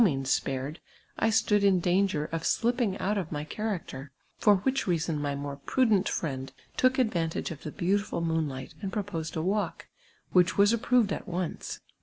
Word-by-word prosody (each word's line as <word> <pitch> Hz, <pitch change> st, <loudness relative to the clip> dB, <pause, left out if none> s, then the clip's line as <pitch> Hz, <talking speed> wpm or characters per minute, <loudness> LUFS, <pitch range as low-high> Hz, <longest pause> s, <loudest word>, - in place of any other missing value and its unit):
means 135 Hz, -8 st, +2 dB
Fprirofl, 135 Hz, +4 st, -4 dB, 0.4 s
I 225 Hz, -, +3 dB
stood 210 Hz, -1 st, +3 dB
in 195 Hz, -2 st, +5 dB
danp^cr 175 Hz, -3 st, +1 dB
of 165 Hz, -, -1 dB
slipjnng 235 Hz, +1 st, +1 dB
out 205 Hz, +2 st, 0 dB
of 170 Hz, -5 st, -5 dB
my 150 Hz, -1 st, -3 dB
cliarac 210 Hz, +2 st, -3 dB
ter, 135 Hz, +2 st, -8 dB, 0.3 s
for 205 Hz, -1 st, +5 dB
wliich 265 Hz, +6 st, 0 dB
reason 165 Hz, -3 st, 0 dB
ray 145 Hz, -1 st, -1 dB
more 140 Hz, 0 st, -5 dB
prudent 215 Hz, -, +2 dB
friend 135 Hz, -4 st, -3 dB, 0.2 s
took 255 Hz, 0 st, +3 dB
advuntaj^e 175 Hz, -13 st, 0 dB
of 155 Hz, -, -8 dB
the 155 Hz, -, -6 dB
beautiful 200 Hz, +3 st, 0 dB
moonlight, 160 Hz, -4 st, -2 dB
and 195 Hz, -, -3 dB
proposed 185 Hz, -7 st, -3 dB
ii 160 Hz, -, -1 dB
walk, 200 Hz, +3 st, -1 dB, 0.4 s
whieh 180 Hz, +1 st, +4 dB
was 205 Hz, +2 st, +5 dB
approved 235 Hz, -2 st, +2 dB
at -, -, -6 dB
once. 180 Hz, -1 st, -4 dB
180 Hz, 175 wpm, -28 LUFS, 155-205 Hz, 0.4 s, in